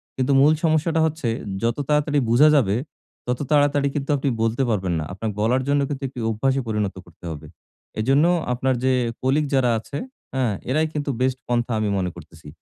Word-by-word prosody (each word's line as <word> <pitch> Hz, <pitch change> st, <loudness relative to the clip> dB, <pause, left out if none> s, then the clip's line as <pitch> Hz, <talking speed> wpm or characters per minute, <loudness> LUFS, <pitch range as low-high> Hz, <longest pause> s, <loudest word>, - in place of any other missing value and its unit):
কিন্তু 130 Hz, +1 st, 0 dB
মূল 150 Hz, +3 st, +6 dB
সমস্যাটা 160 Hz, 0 st, +2 dB
হচ্ছে 160 Hz, -4 st, -2 dB, 0.4 s
যত 115 Hz, 0 st, +1 dB
তাড়াতাড়ি 150 Hz, -1 st, +2 dB
বুঝা 125 Hz, +7 st, +6 dB
যাবে, 105 Hz, -8 st, +3 dB, 0.5 s
তত 125 Hz, 0 st, -1 dB
তাড়াতাড়ি 145 Hz, -1 st, +3 dB
কিন্তু 140 Hz, -2 st, -3 dB
আপনি 135 Hz, 0 st, -1 dB
বলতে 115 Hz, +4 st, +1 dB
পারবেন 95 Hz, -5 st, 0 dB
না। -, -, -2 dB
আপনার 110 Hz, +4 st, -3 dB
বলার 120 Hz, +5 st, +2 dB
জন্য 140 Hz, 0 st, +2 dB
কিন্তু 140 Hz, -1 st, -4 dB
একটি 130 Hz, -1 st, -9 dB
অভ্যাসে 135 Hz, +5 st, 0 dB
পরিণত 105 Hz, -3 st, -1 dB
করতে 85 Hz, 0 st, -16 dB
হবে। 75 Hz, 0 st, -8 dB, 0.5 s
এজন্য 135 Hz, +7 st, +3 dB, 0.3 s
আপনার 130 Hz, +2 st, 0 dB
যে 130 Hz, 0 st, +3 dB, 0.3 s
কলিগ 140 Hz, +4 st, +2 dB
যারা 130 Hz, -2 st, +3 dB
আছে, 140 Hz, +6 st, -7 dB, 0.4 s
হ্যাঁ? 130 Hz, -5 st, 0 dB, 0.2 s
এরাই 155 Hz, +4 st, +2 dB
কিন্তু 145 Hz, -1 st, -3 dB
বেস্ট 130 Hz, 0 st, +1 dB
পন্থা 120 Hz, 0 st, 0 dB
আমি 105 Hz, -1 st, 0 dB
মনে 90 Hz, -1 st, -1 dB
করতেছি। 80 Hz, -2 st, -13 dB
130 Hz, 180 wpm, -22 LUFS, 110-145 Hz, 0.5 s, মূল